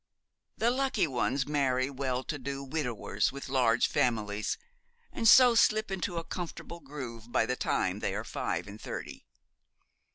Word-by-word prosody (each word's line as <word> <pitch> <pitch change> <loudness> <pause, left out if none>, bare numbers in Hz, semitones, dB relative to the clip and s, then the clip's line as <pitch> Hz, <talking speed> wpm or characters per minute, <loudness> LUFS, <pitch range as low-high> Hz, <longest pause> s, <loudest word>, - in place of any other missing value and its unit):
The 235 +2 +2
lucky 260 -6 +1
ones 135 -1 0
marry 130 -3 +1
well 130 -1 -2
to 145 +1 -4
do 140 +1 -4
widowers 125 -8 -1
with 140 +1 -8
large 125 -3 +3
families, 105 -3 0 0.5
and 225 - 0
so 250 +2 +9
slip 215 -2 +3
into 180 -2 -2
a 165 - -2
comfortable 170 0 -6
groove 125 -6 -8
by - - +3
the 125 - -1
time - - 0
they - - -2
are - - -3
five - - -3
and 105 +2 -10
thirty. - - -7
135 Hz, 155 wpm, -30 LUFS, 125-170 Hz, 0.5 s, so